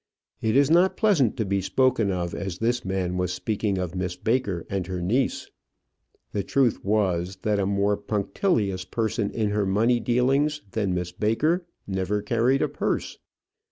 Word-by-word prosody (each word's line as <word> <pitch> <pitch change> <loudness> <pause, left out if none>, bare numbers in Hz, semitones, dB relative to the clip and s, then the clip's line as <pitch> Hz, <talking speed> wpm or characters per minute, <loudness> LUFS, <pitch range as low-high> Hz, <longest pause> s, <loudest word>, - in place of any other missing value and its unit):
It 110 +1 +1
is 140 +1 +4
not 180 +3 +4
pleasant 175 - +3
to 110 - 0
be 100 0 0
spoken 125 0 +2
of 90 -2 -2
as 95 -3 -4
this 120 +4 0
man 95 -1 -2
was 90 0 0
speaking 100 +1 -1
of 90 -2 -3
Miss 90 -1 -3
Baker 110 -7 -1
and 95 -3 -3
her 95 -1 -3
niece. 110 +10 -1 0.8
The 100 - -1
truth 130 +2 +1
was, 95 -3 0
that 105 -1 +1
a 95 - +1
more 100 +1 +1
punctilious 105 - -1
person 110 +2 -1
in 110 -3 -1
her 105 -1 0
money 115 +5 +2
dealings 135 +6 +1
than 100 -4 -1
Miss 90 0 -3
Baker 155 - 0 0.2
never 95 +1 -1
carried 120 +5 +2
a - - +2
purse. - - -3
105 Hz, 165 wpm, -25 LUFS, 95-120 Hz, 0.8 s, is